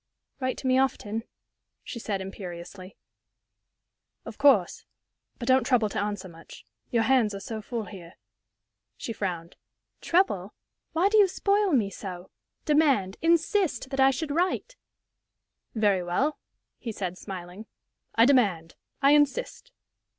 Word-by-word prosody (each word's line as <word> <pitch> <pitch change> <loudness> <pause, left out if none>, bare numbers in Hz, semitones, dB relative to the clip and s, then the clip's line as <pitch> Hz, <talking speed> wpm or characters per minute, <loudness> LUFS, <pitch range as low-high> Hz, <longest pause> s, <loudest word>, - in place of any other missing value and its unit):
"Write 255 -1 -2
to - - -9
me 260 0 +4
often," 225 -4 -1 0.6
she 235 - -7
said, 200 -3 -3
imperiously. 185 0 -9 1.3
"Of - - -9
course. 245 -11 +4 0.5
But 240 - -6
don't 260 0 +5
trouble 235 -5 +2
to - - -3
answer 205 -2 -3
much. 165 -2 -14 0.2
Your 230 -2 +2
hands 225 -4 +3
are - - -5
so 220 +2 -6
full 225 0 -4
here." 180 -2 -11 0.8
She 230 - -5
frowned. 175 -5 -4 0.4
"Trouble! 215 - +1 0.4
Why 345 +4 +3
do 430 +1 +4
you 405 - +7
spoil 400 +1 +1
me 220 -9 +2
so? 185 -3 -8 0.3
Demand 280 -11 +2
insist 330 - +1
that 270 - -3
I 265 0 +7
should 290 +3 -2
write!" 365 +9 -1 1.0
"Very 205 -4 +2
well," 265 +13 0 0.4
he 235 - -5
said, 185 -4 -4
smiling, 185 +2 -8 0.5
"I 230 - +6
demand 200 -12 +2 0.3
I 275 - +6
insist!" 295 - +1
225 Hz, 135 wpm, -27 LUFS, 190-285 Hz, 1.3 s, you